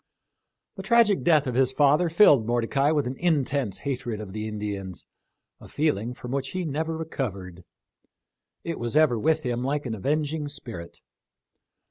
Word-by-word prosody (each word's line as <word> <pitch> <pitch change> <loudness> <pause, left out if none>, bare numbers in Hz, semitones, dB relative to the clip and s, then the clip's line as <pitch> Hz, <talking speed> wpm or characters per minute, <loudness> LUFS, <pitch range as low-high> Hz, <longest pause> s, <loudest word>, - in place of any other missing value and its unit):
The - - -5
tragic 210 0 +3
death 155 -4 +4
of 130 - -2
his 130 +1 +2
father 150 +5 +3
filled 150 - +5
Mordecai 120 +4 +1
with 150 -2 +1
an 125 +2 -3
intense 140 - 0
hatred 120 -5 -3
of 100 -3 -8
the 110 0 -4
Indians 100 -3 -5 0.3
— - - -58
a - - -12
feeling 125 -6 -1
from 125 - -8
which 135 0 -3
he 185 -1 -2
never 160 +2 -2
recovered. 100 - -5 1.0
It 170 -1 -4
was 120 +5 -1
ever 145 -7 +4
with 155 +4 +1
him 120 -1 -2
like 145 +2 -1
an 120 - -3
avenging 150 +6 -1
spirit. 115 -11 -8
135 Hz, 160 wpm, -25 LUFS, 115-155 Hz, 1.0 s, filled